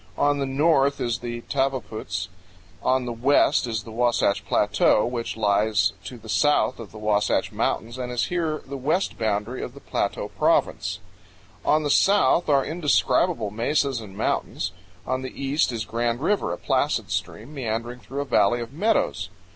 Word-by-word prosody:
On 145 0 +2
the 135 - -1
north 140 0 +2
is 120 0 -1
the 120 -1 -5
Tavaputs; 115 -9 -2 0.5
on 130 -1 +1
the 120 - -3
west 125 +1 +3
is 110 -2 -2
the 115 - -10
Wasatch 115 -4 +1
Plateau, 105 +1 +3
which 120 -2 -3
lies 105 0 +2
to 125 - -7
the 110 -1 -14
south 145 +5 +2
of 115 -4 -9
the 110 - -11
Wasatch 105 -1 +1
Mountains 115 +3 -2
and 125 -1 -4
is 120 -1 0
here 165 -4 -2
the 140 +1 -6
west 155 +9 0
boundary 110 +3 -1
of - - -6
the - - -10
Plateau - - -2
Province; - - +1 0.7
on 155 +1 +3
the 145 - 0
south 195 -3 +4
are 140 -2 +4
indescribable 150 - +1
mesas 135 +3 0
and 100 -3 -11
mountains; - - -1 0.3
on 130 0 -1
the 130 - -8
east 140 +1 +1
is 115 -2 -3
Grand 115 +1 -1
River, 200 +8 0
a - - -3
placid - - 0
stream 115 +8 -4
meandering 120 -2 -3
through 135 +3 -5
a - - -3
valley 120 -2 +3
of 120 +2 -6
meadows. 225 - 0
125 Hz, 170 wpm, -24 LUFS, 110-140 Hz, 0.7 s, south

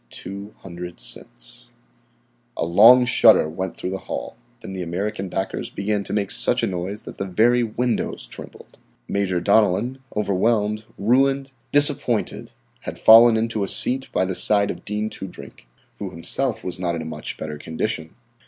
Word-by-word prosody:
"Two 100 +2 -9
hundred 90 -2 -9
cents!" - - -10 0.9
A - - 0
long 115 +9 +7
shudder 115 -8 +5
went 90 +3 -5
through 90 - -4
the 95 - -4
hall. - - -6 0.3
Then 95 - -8
the 95 - -5
American 95 +3 -3
backers 95 +2 -3
began 100 0 -2
to - - -7
make 100 -2 -1
such - - 0
a - - +4
noise 95 +3 -4
that - - -11
the 100 - -3
very 115 +6 +3
windows 120 - -2
trembled. - - -13 0.3
Major 95 -3 -1
Donellan, 110 +6 +2 0.2
overwhelmed, 105 +1 0
ruined, 135 +5 +2 0.2
disappointed, 145 -5 +2 0.3
had - - -7
fallen 115 +1 +7
into 110 -2 -1
a - - -2
seat 130 +6 0
by 95 - +1
the 95 - -2
side 100 +2 +3
of 85 - -10
Dean 105 +1 -2
Toodrink, 95 -9 -10 0.3
who - - -4
himself 110 +7 -2
was 90 -1 -5
not 85 -2 -1
in 80 - -4
a - - -9
much 80 -1 -6
better 75 -1 -6
condition. 80 +2 -4
100 Hz, 160 wpm, -22 LUFS, 90-115 Hz, 0.9 s, long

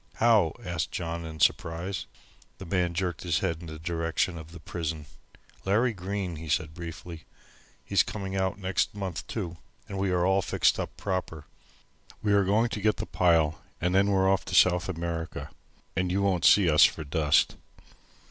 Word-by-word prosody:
"How?" 110 -8 +4
asked 85 -2 -2
John, 85 -1 -4
in 80 -1 -8
surprise. 85 +5 0 0.5
The 95 - -9
man 90 -1 0
jerked 90 -3 -2
his 85 -3 0
head 85 -4 -1
in 85 - -10
the 80 0 -7
direction 85 +2 -1
of 80 0 -11
the 85 - -10
prison. 80 -1 -4 0.6
"Larry 110 +5 +2
Green," 95 -2 -4
he 80 0 -8
said 75 +1 0
briefly. 85 -1 -8 0.6
"He's - - +3
coming 95 -2 -4
out 95 0 0
next 95 +1 -1
month, 95 -5 -5
too, 90 -6 -4 0.3
and 100 - -5
we 95 0 +1
are 90 -1 +2
all 95 +1 +3
fixed - - +2
up - - -5
proper. 90 -6 -3 0.8
We 105 -1 +2
are 100 -1 +5
going 105 +5 +2
to 105 - -4
get 105 +1 +2
the - - -3
pile 80 -2 +2 0.2
and 90 +1 0
then 100 +1 +4
we're 95 -1 +3
off 95 0 +2
to 90 - -3
South 90 0 +4
America, 85 -1 -4 0.4
and 90 0 0
you 100 +2 +1
won't 95 -4 +1
see 100 -4 +6
us 80 0 +6
for 80 - +3
dust." 75 0 +2
90 Hz, 180 wpm, -28 LUFS, 80-95 Hz, 0.8 s, see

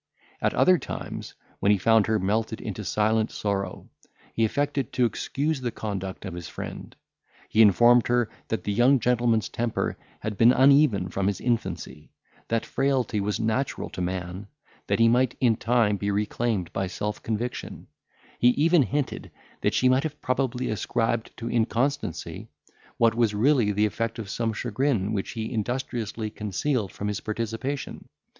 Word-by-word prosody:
At - - +1
other 185 -2 +5
times, - - -6 0.2
when 100 - +3
he 105 - +4
found 110 +2 +4
her 110 0 +2
melted 110 +3 -1
into 105 0 -5
silent 110 +4 +1
sorrow, 100 -1 -3 0.5
he 115 - +1
affected 140 +2 0
to 125 - +3
excuse 140 +6 -1
the 125 - -1
conduct 100 -4 -5
of 95 - -5
his 85 -2 -7
friend. - - -8 0.5
He 110 - +4
informed 120 +4 +6
her, 120 -1 +2 0.2
that 110 - -2
the 105 - -1
young 125 +5 +4
gentleman's 120 -2 +2
temper 120 -1 -2 0.2
had 105 -2 -4
been 120 +2 +7
uneven 130 -8 +4
from 95 +2 -1
his 100 -2 -1
infancy; 115 -9 -3 0.4
that 115 0 0
frailty 130 -5 0
was 100 +1 -1
natural 115 +4 -1
to - - -5
man; 90 +2 -4 0.4
that - - +1
he 115 - +5
might 125 +1 +2
in 120 -3 +3
time 115 -3 +2
be 100 +1 -2
reclaimed 105 -1 -1
by 95 -1 -1
self 105 +3 -4
conviction; 115 +3 -4 0.5
he 120 - +5
even 165 +2 +5
hinted, 140 +1 -2 0.3
that - - +1
she 130 - +3
might 130 +1 +4
have 155 -1 -5
probably 125 -1 -1
ascribed 115 +2 -1
to 115 - -5
inconstancy, 120 - -1 0.5
what 115 -1 +4
was 115 -3 +1
really 120 -1 +3
the 105 +1 +2
effect 115 +2 -2
of 105 -4 -6
some 115 -1 -1
chagrin 115 -2 -1
which 100 -2 -3
he 110 +1 -4
industriously 115 -1 -3
concealed 105 - -2
from 105 - -5
his 105 0 -2
participation. 115 +5 -4
115 Hz, 160 wpm, -26 LUFS, 105-125 Hz, 0.5 s, been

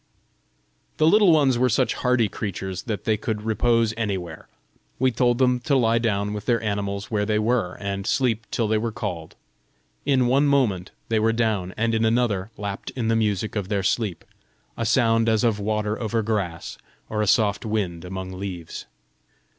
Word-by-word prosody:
The 155 - +3
Little 200 +2 +6
Ones 140 -6 +3
were 130 0 +3
such 125 +2 +2
hardy 125 -3 +2
creatures 95 -2 -5
that 110 -4 -3
they 110 -1 +1
could 110 -1 -3
repose 115 0 +2
anywhere: 95 -7 -4 0.5
we 130 0 +2
told 120 +1 +2
them 125 -1 +3
to 140 +3 0
lie 115 -2 +3
down 105 -3 -1
with 105 -1 -6
their 120 -1 +3
animals 100 -1 -3
where 105 -2 +1
they 105 0 +1
were, 110 -4 0
and 100 0 -4
sleep 115 -5 0
till 115 - 0
they 110 0 +1
were 115 +1 -2
called. 90 -8 -5 0.7
In 135 -3 +2
one 135 +4 +3
moment 115 -11 +1 0.2
they 110 -1 +2
were 110 +1 +2
down, 110 -5 0
and 115 +1 +1
in 110 0 +1
another 110 -4 +1
lapt 100 -1 -5
in 115 -3 -1
the 115 - +3
music 105 -1 0
of 100 -3 -3
their 100 -3 0
sleep, 100 -1 -1 0.5
a 115 - -2
sound 115 -1 +3
as 110 +1 +2
of 115 -3 +2
water 105 +1 -1
over 115 0 -1
grass, 100 -6 -3 0.3
or 105 -1 -2
a 105 - 0
soft 105 -1 +2
wind 100 -7 -2
among 95 +1 -6
leaves. 90 -3 -7
110 Hz, 180 wpm, -24 LUFS, 100-120 Hz, 0.7 s, Little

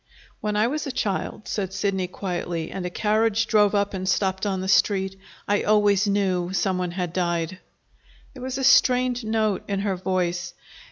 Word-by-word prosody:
"When 210 -1 -2
I 210 +1 +3
was 295 +5 -2
a - - -2
child," 210 -2 -3
said 195 -3 -2
Sidney 195 -2 -1
quietly, 175 -3 -4
"and 185 -2 -4
a - - -3
carriage 220 +3 +1
drove 210 -2 +3
up 200 0 +1
and 185 -1 -2
stopped 190 0 0
on 190 -2 -1
the 190 - -4
Street, 190 0 +2 0.3
I 205 0 +2
always 205 -1 +3
knew 190 -3 0
some 190 -1 0
one 180 -1 -1
had 175 -1 -4
died!" 175 0 -1 0.7
There 260 - -11
was 260 +1 -4
a 270 - -3
strained 250 -2 +4
note 220 -2 0
in 200 -1 -1
her 200 -2 0
voice. 180 -1 -2
195 Hz, 180 wpm, -24 LUFS, 185-215 Hz, 0.7 s, strained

